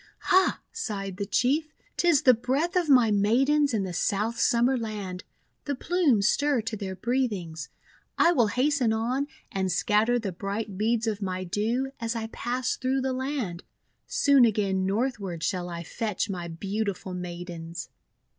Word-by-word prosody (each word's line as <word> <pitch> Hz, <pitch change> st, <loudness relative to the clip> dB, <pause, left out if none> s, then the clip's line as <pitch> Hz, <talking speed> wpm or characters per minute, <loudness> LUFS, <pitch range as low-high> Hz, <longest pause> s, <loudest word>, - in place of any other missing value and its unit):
"Ha!" 375 Hz, 0 st, +4 dB
sighed 195 Hz, -4 st, -4 dB
the 200 Hz, -1 st, -3 dB
Chief, 285 Hz, +9 st, +1 dB, 0.2 s
"'tis 345 Hz, -5 st, +3 dB
the 255 Hz, -, +7 dB
breath 265 Hz, +9 st, -1 dB
of 350 Hz, -4 st, +1 dB
my 245 Hz, -5 st, +6 dB
Maidens 270 Hz, +9 st, +3 dB
in 215 Hz, -4 st, 0 dB
the 185 Hz, -2 st, -4 dB
South 210 Hz, +6 st, 0 dB
Summer 240 Hz, +3 st, +3 dB
Land; 205 Hz, -6 st, -4 dB, 0.4 s
the 285 Hz, -, -1 dB
plumes 275 Hz, -, +2 dB
stir 285 Hz, -1 st, +2 dB
to 225 Hz, 0 st, -4 dB
their 195 Hz, -2 st, -5 dB
breathings! 200 Hz, -8 st, -2 dB, 0.5 s
I 340 Hz, -, +5 dB
will 245 Hz, -10 st, +3 dB
hasten 255 Hz, 0 st, +1 dB
on, 250 Hz, +6 st, -1 dB, 0.2 s
and 190 Hz, -1 st, -1 dB
scatter 215 Hz, +6 st, +2 dB
the 215 Hz, -5 st, -3 dB
bright 200 Hz, +3 st, -4 dB
beads 225 Hz, +3 st, +1 dB
of 215 Hz, -2 st, -2 dB
my 185 Hz, -1 st, -2 dB
Dew 225 Hz, +8 st, -1 dB
as 230 Hz, 0 st, -2 dB
I 225 Hz, -1 st, -2 dB
pass 245 Hz, +1 st, -2 dB
through 265 Hz, +1 st, 0 dB
the 260 Hz, 0 st, -1 dB
land. 255 Hz, -10 st, -3 dB, 0.5 s
Soon 285 Hz, -, +4 dB
again 195 Hz, -4 st, +2 dB
northward 200 Hz, -6 st, -2 dB
shall 180 Hz, -1 st, -1 dB
I 170 Hz, -1 st, -5 dB
fetch 210 Hz, +1 st, -2 dB
my 175 Hz, -2 st, -4 dB
beautiful 195 Hz, +2 st, -3 dB
Maidens!' 175 Hz, -2 st, -6 dB
220 Hz, 155 wpm, -27 LUFS, 190-260 Hz, 0.5 s, the